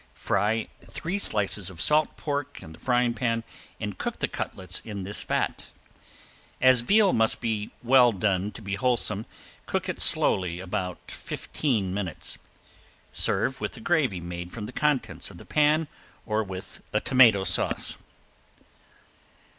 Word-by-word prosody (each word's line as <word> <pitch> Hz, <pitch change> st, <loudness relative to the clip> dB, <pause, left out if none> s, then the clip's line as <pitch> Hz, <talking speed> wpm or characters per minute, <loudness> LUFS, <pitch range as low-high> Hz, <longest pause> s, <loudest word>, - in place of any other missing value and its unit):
Fry 105 Hz, +3 st, 0 dB, 0.2 s
three 185 Hz, +5 st, -3 dB
slices 100 Hz, -, +1 dB
of 90 Hz, -3 st, -10 dB
salt 150 Hz, -, +3 dB
pork 145 Hz, -1 st, -4 dB
in 80 Hz, -, -10 dB
the -, -, -15 dB
frying 125 Hz, -2 st, +2 dB
pan 115 Hz, -1 st, -1 dB, 0.4 s
and -, -, -5 dB
cook -, -, -3 dB
the -, -, -1 dB
cutlets 90 Hz, -1 st, -4 dB
in 100 Hz, -3 st, -6 dB
this 100 Hz, +3 st, -2 dB
fat. -, -, -2 dB, 0.9 s
As 130 Hz, -1 st, +6 dB
veal 200 Hz, -, +4 dB
must 110 Hz, 0 st, +2 dB
be 110 Hz, -2 st, -2 dB
well 125 Hz, 0 st, +6 dB
done 100 Hz, -1 st, 0 dB
to 115 Hz, -, -10 dB
be 100 Hz, 0 st, -4 dB
wholesome, 110 Hz, -1 st, 0 dB, 0.4 s
cook -, -, -1 dB
it -, -, -1 dB
slowly 90 Hz, -2 st, +4 dB
about 90 Hz, -1 st, -4 dB
fifteen 110 Hz, -11 st, -2 dB
minutes. 95 Hz, -5 st, -3 dB, 0.7 s
Serve -, -, +1 dB
with -, -, -4 dB
a -, -, -9 dB
gravy 130 Hz, -, +1 dB
made 85 Hz, +1 st, -6 dB
from 110 Hz, -3 st, -6 dB
the 105 Hz, -, -7 dB
contents 150 Hz, -4 st, -1 dB
of -, -, -12 dB
the -, -, -12 dB
pan 155 Hz, +1 st, +2 dB, 0.4 s
or 110 Hz, 0 st, 0 dB
with 95 Hz, 0 st, -8 dB
a 105 Hz, -, +2 dB
tomato 115 Hz, -6 st, +5 dB
sauce. 90 Hz, -2 st, +1 dB
110 Hz, 145 wpm, -26 LUFS, 95-130 Hz, 0.9 s, As